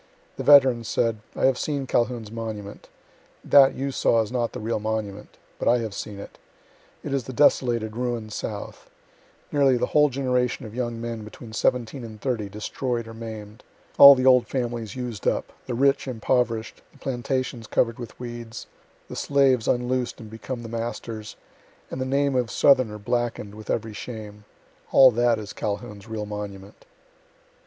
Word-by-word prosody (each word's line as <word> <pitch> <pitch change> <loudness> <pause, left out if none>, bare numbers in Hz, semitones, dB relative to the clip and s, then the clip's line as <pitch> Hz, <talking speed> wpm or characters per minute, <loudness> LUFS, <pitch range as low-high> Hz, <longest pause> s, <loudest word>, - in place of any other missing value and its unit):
The - - -4
veteran 135 -5 +6
said: 115 0 0 0.2
"I - - +1
have 130 -1 +3
seen 140 -3 -2
Calhoun's 120 -3 -1
monument. 110 -3 -7 0.6
That 135 -1 +6
you 140 +1 -2
saw 115 -3 +2
is 110 - -9
not 120 -2 -1
the - - -7
real 110 +1 -2
monument. 105 -1 -4 0.2
But - - -2
I 120 - +5
have 110 -3 -4
seen 100 0 -6
it. 100 - -11 0.6
It 140 - -4
is 135 -4 -1
the 130 - -7
desolated, 120 -5 +2
ruined 120 -3 -3
south; 105 -1 -6 0.6
nearly 135 -3 +4
the - - +1
whole 150 0 +5
generation 125 -2 -1
of 110 - -9
young 120 -1 -3
men 115 -1 -5
between 110 +1 -11
seventeen 120 +2 0
and 110 -2 -9
thirty 110 -5 -2
destroyed 115 +3 -3
or 115 - -9
maim'd; 110 -1 -9 0.4
all 140 0 +12
the 130 0 -1
old 125 -2 +6
families 120 -4 -3
used 120 -6 -5
up - - -1
the 125 - -2
rich 140 +2 +2
impoverish'd, 115 -2 -1
the - - -21
plantations 130 -2 -3
cover'd 115 +1 +1
with 120 -3 -9
weeds, 120 -2 -7 0.4
the - - -8
slaves 135 -4 +2
unloos'd 125 0 0
and 110 -2 -10
become 120 +2 -6
the - - -6
masters, 115 -1 -5 0.6
and 130 - -4
the - - -1
name 140 +1 +1
of 125 -2 +1
southerner 130 -7 +3
blacken'd 115 -1 -2
with 105 0 -11
every 110 -1 -2
shame 105 -2 -8 0.5
all 130 -1 +8
that 120 0 +2
is 105 -1 -7
Calhoun's 105 0 -5
real 110 -2 -4
monument." 105 - -8
115 Hz, 165 wpm, -24 LUFS, 110-130 Hz, 0.6 s, all